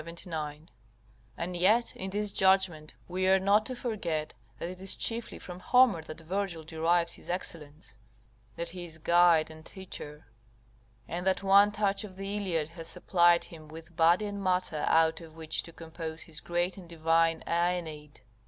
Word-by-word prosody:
] - - -13 1.3
and 175 +1 -4
yet 210 +7 +3
in 190 - -5
this 205 +1 +1
judgment 190 -6 +3
we 185 +1 -1
are 190 - +6
not 200 +3 +3
to 255 - -5
forget 180 -11 -3 0.2
that - - -4
it 185 +1 -8
is 195 - 0
chiefly 230 0 -1
from 180 0 -9
Homer 240 -3 +4
that 155 +1 -9
Virgil 180 -1 -3
derives 165 +2 +1
his - - -7
excellence, 160 -6 -6 0.6
that 170 0 -4
he 180 +1 -7
is 165 -2 -6
guide 170 -1 +4
and 160 0 -12
teacher; 155 -5 -9 0.8
and 180 +2 -4
that 190 +1 +1
one 200 +1 +6
touch 205 -1 0
of 195 -3 -10
the 195 +1 -5
Iliad 170 -7 -1
has 165 -1 -7
supplied 175 -1 +3
him 155 -2 -12
with 165 +2 -12
body 170 +5 +4
and 200 -1 -5
matter 180 -4 0
out 160 +1 +3
of 160 -1 -13
which 160 -1 +1
to 165 - -11
compose 160 -1 -7
his 160 -2 -6
great 175 +2 -1
and 180 -3 -12
divine 165 0 +2
AEneid. 170 -4 -2
175 Hz, 170 wpm, -29 LUFS, 160-190 Hz, 1.3 s, are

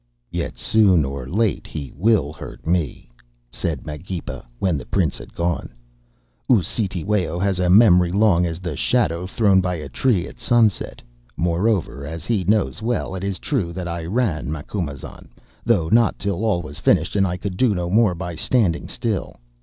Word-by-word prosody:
"'Yet - - -3
soon 95 -8 +4
or 70 -2 -5
late 105 +2 0
he 70 -4 -6
will 85 -4 +2
hurt - - -10
me,' 85 -3 -1 0.4
said - - -3
Magepa, 80 +4 -6
when 90 +2 +1
the 65 -4 -6
Prince 85 -8 0
had - - -12
gone. 85 -7 -2 0.8
'U'Cetewayo 95 -3 0
has 95 0 0
a 90 -1 +1
memory 90 -3 +6
long 95 -2 +3
as 85 -1 -2
the 85 -4 -4
shadow 85 +6 0
thrown 100 -2 +3
by 90 -1 -1
a 75 -4 -6
tree 95 - +1
at - - -13
sunset. 115 -4 +1 0.3
Moreover, 85 - 0
as 80 +3 -6
he 110 -6 0
knows 105 +4 +1
well, 115 -4 -1
it 95 0 -5
is 100 -1 -2
true 100 - -2
that 90 0 -5
I 85 -1 -4
ran, 85 - -1
Macumazahn, 75 -2 -6 0.4
though 80 - +2
not 115 +5 +3
till 100 0 -2
all 100 -6 +1
was 75 -2 -9
finished - - +2
and 95 -1 +3
I 90 0 -2
could 95 0 -5
do 115 0 +2
no 90 -1 -2
more 105 0 +3
by 85 0 -5
standing 90 0 +1
still. 110 -5 -3
90 Hz, 170 wpm, -22 LUFS, 85-105 Hz, 0.8 s, memory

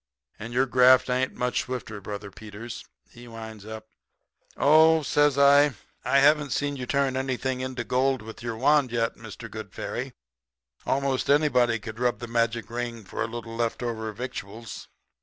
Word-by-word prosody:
And 115 +2 -7
your 125 +2 +2
graft 130 0 +5
ain't 130 +1 0
much 125 0 0
swifter, 115 -5 -6
Brother 100 0 -7
Peters,' 110 +3 -9 0.3
he 120 +1 -13
winds 110 -2 -9
up. 110 0 -8 0.7
"'Oh,' 160 +2 +5
says 145 0 +2
I, 140 -1 +6 0.3
'I 140 - +2
haven't 145 0 +4
seen 145 0 -1
you 125 -2 -6
turn 140 -1 +1
anything 130 0 -2
into 130 -1 -4
gold 130 0 +1
with 110 0 -10
your 115 -2 -4
wand 140 0 +3
yet, 115 -1 0
Mr. - - -10
Good - - -8
Fairy. - - -4 0.7
'Most 135 -1 0
anybody 135 -5 +3
could 110 0 -9
rub 125 -1 +1
the 120 - -6
magic 115 -2 0
ring 120 -1 -4
for - - -6
a 110 - 0
little 115 0 -7
left 115 +1 -2
over 110 -2 -3
victuals.' 115 -1 -7
125 Hz, 165 wpm, -26 LUFS, 115-135 Hz, 0.7 s, I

